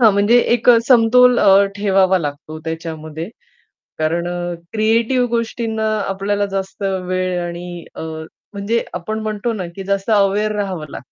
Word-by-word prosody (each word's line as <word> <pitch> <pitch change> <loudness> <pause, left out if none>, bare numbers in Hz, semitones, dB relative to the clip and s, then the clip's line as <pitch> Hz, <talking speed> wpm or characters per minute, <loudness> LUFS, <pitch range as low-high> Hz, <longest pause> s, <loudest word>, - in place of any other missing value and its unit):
हां, 225 -3 +7
म्हणजे 205 +5 +4 0.2
एक 240 +1 -1
अ, 235 - +7
समतोल 250 0 +5
अ, 195 +1 +6
ठेवावा 195 -2 +3
लागतो 155 0 -6
त्याच्यामध्ये 160 0 -6 0.7
कारण 165 +2 0
अ, 175 0 -3 0.2
क्रिएटिव्ह 230 +3 +2
गोष्टींना 225 -1 -2 0.2
आपल्याला 200 +1 -1
जास्त 195 +1 -4
वेळ 185 -1 -1
आणि 175 0 -7
अ, - - -7 0.5
म्हणजे 210 +3 -1
आपण 220 0 -4
म्हणतो 215 +2 -2
ना, 195 -5 -4
की 195 - -6
जास्त 195 +2 -1
अवेअर 205 +1 +2
राहावं 190 -6 -3
लाग - - -8
200 Hz, 145 wpm, -18 LUFS, 175-220 Hz, 0.7 s, हां